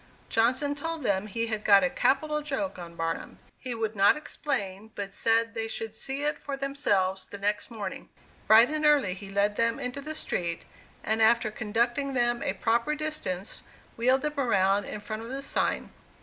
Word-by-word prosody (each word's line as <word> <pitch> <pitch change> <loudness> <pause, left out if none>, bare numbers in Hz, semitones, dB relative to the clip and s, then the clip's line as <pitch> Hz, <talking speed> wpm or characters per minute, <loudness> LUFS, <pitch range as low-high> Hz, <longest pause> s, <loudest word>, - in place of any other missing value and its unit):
Johnson 255 +6 +2
told 325 +1 -4
them 200 -2 +1
he 230 +3 -2
had 220 -2 -3
got 200 -2 +6
a - - +4
capital 300 +3 +1
joke 290 -5 -3
on 170 -1 -9
Barnum; 165 0 -3 0.2
he 250 -2 -5
would 220 -1 -2
not 200 +7 +5
explain, 215 -9 -4
but 200 -1 -5
said 230 +1 +2
they 225 -1 -2
should 225 -1 -3
see 270 +5 -4
it 300 +1 -1
for 280 -1 -4
themselves 205 -9 0
the 200 - -8
next 205 +1 -1
morning. 210 -5 -6 0.4
Bright 220 +3 +8
and 310 0 -1
early 290 -11 +4
he 195 +1 -9
led 200 +1 +1
them 230 0 +1
into 250 +3 -4
the 310 +2 -6
street, 170 - -3 0.4
and 220 +1 0
after 220 0 +4
conducting 240 +5 -1
them 240 -1 +2
a - - 0
proper 235 +8 +1
distance, 295 -12 -4 0.3
wheeled 255 +3 +2
them 300 -1 -2
around 200 -5 +2
in 210 - -5
front 215 +1 -5
of 230 - -8
the 270 +1 -4
sign. - - -1
230 Hz, 185 wpm, -28 LUFS, 200-275 Hz, 0.4 s, Bright